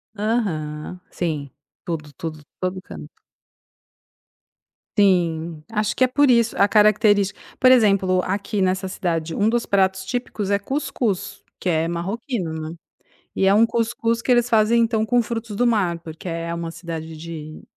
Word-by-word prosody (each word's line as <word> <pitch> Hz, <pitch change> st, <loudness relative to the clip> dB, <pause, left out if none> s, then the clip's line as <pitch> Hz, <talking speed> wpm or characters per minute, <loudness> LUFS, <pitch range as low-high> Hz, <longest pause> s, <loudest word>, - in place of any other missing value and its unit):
Aham. 180 Hz, -7 st, -2 dB
Sim, 155 Hz, -5 st, -3 dB, 0.3 s
tudo, 150 Hz, -4 st, -5 dB
tudo, 155 Hz, -2 st, -7 dB, 0.2 s
todo 185 Hz, 0 st, -2 dB
canto. -, -, -10 dB, 1.9 s
Sim, 170 Hz, -5 st, +2 dB
acho 210 Hz, -1 st, 0 dB
que 255 Hz, -, +3 dB
é -, -, +5 dB
por 285 Hz, +2 st, +3 dB
isso 235 Hz, -2 st, +3 dB
a 200 Hz, -, +5 dB
característica. 205 Hz, -1 st, +3 dB, 0.2 s
Por 255 Hz, 0 st, +6 dB
exemplo: 195 Hz, -6 st, +4 dB
aqui 200 Hz, +1 st, -2 dB
nessa 190 Hz, +1 st, +1 dB
cidade, 165 Hz, -3 st, -2 dB
um 205 Hz, +5 st, +2 dB
dos 235 Hz, 0 st, 0 dB
pratos 190 Hz, -1 st, +1 dB
típicos 210 Hz, -2 st, -3 dB
é 200 Hz, -, +3 dB
cuscuz, 235 Hz, -4 st, -2 dB, 0.2 s
que -, -, -5 dB
é 165 Hz, -1 st, +2 dB
marroquino, 185 Hz, -, -3 dB, 0.2 s
né, 165 Hz, -, -8 dB, 0.6 s
e 195 Hz, -, +2 dB
é 195 Hz, -, +5 dB
um 220 Hz, +3 st, +6 dB
cuscuz 230 Hz, 0 st, -1 dB
que 250 Hz, -, 0 dB
eles 240 Hz, -1 st, +4 dB
fazem 230 Hz, 0 st, +4 dB
então 225 Hz, -1 st, +1 dB
com 245 Hz, +1 st, +3 dB
frutos 225 Hz, -2 st, -5 dB
do 245 Hz, +4 st, +2 dB
mar, 200 Hz, -7 st, +2 dB
porque 165 Hz, +2 st, -8 dB
é 165 Hz, 0 st, -3 dB
uma 170 Hz, 0 st, -4 dB
cidade 165 Hz, -1 st, -7 dB
de 155 Hz, -1 st, -8 dB
195 Hz, 155 wpm, -22 LUFS, 170-225 Hz, 1.9 s, Por